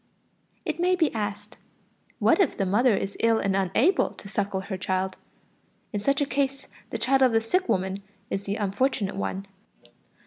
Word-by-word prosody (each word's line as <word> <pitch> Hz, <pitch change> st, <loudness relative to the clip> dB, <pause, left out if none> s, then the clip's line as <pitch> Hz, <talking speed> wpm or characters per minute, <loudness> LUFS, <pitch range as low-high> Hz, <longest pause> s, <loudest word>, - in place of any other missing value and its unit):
It 315 Hz, -2 st, -2 dB
may 365 Hz, +1 st, +3 dB
be 330 Hz, -4 st, +1 dB
asked: 205 Hz, -2 st, -4 dB, 0.6 s
what -, -, +4 dB
if 350 Hz, -, +1 dB
the 195 Hz, -, +1 dB
mother 210 Hz, +3 st, +3 dB
is 195 Hz, +1 st, -3 dB
ill 230 Hz, 0 st, +4 dB
and 195 Hz, -3 st, 0 dB
unable 195 Hz, -, +3 dB
to -, -, -11 dB
suckle 195 Hz, -1 st, -1 dB
her 195 Hz, 0 st, -5 dB
child? 185 Hz, 0 st, -1 dB, 0.8 s
In 205 Hz, -, 0 dB
such 275 Hz, +7 st, +1 dB
a -, -, +3 dB
case 275 Hz, +1 st, -1 dB, 0.2 s
the -, -, -3 dB
child 270 Hz, +1 st, +2 dB
of 255 Hz, -3 st, +5 dB
the 225 Hz, -, +5 dB
sick 365 Hz, +12 st, 0 dB
woman 190 Hz, +1 st, 0 dB, 0.3 s
is 195 Hz, -, -1 dB
the 200 Hz, 0 st, -3 dB
unfortunate 205 Hz, 0 st, 0 dB
one. 195 Hz, 0 st, -3 dB
210 Hz, 175 wpm, -26 LUFS, 195-270 Hz, 0.8 s, of